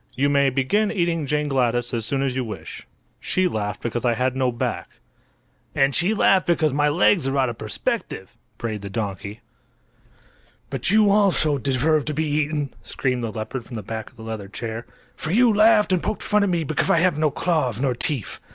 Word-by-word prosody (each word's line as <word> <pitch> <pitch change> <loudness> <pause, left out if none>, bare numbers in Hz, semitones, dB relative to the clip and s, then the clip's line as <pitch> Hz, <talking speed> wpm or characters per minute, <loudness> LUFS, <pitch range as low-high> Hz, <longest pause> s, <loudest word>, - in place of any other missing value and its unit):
"you 140 +2 +2
may 140 -1 +3
begin 195 - +1
eating 170 -7 -1
Jane 150 +1 0
Gladys 120 -3 0
as 115 -2 -2
soon 135 +2 0
as 130 -2 -1
you 130 - -1
wish. 110 -3 -8 0.3
She 185 0 0
laughed 105 - -3
because 120 0 -2
I 120 -2 +2
had 130 +2 0
no 130 -1 +1
back." 120 - -3 0.9
"And 135 0 +3
she 185 +9 +2
laughed 195 -2 +3
because 160 -4 +2
my 145 +1 +2
legs 165 0 +3
are 135 +1 -1
out 130 -2 +2
of 115 - -7
perspective," 110 - -3 0.2
brayed 110 -4 -4
the 100 - -6
donkey. 100 0 -5 1.3
"But 135 +1 -1
you 210 0 +5
also 185 -8 +3
deserve 140 +3 +1
to 150 - -3
be 160 +2 0
eaten," 150 -1 -1
screamed 125 -2 -2
the 115 - -3
leopard 110 +3 -5
from 120 - -9
the 110 - -5
back 110 +2 -6
of - - -26
the 115 - -12
leather 110 -3 -6
chair; 115 +2 -6 0.3
"for 155 - -5
you 235 +3 +4
laughed 210 -1 +4
and 180 - +1
poked 215 +1 -3
fun 210 0 +2
at 200 - +2
me 170 -2 0
because 155 0 -1
I - - +4
had 175 -1 +3
no 155 -1 +3
claws 145 - -1
nor 130 -1 +1
teeth! 125 -1 -1
140 Hz, 205 wpm, -23 LUFS, 120-165 Hz, 1.3 s, you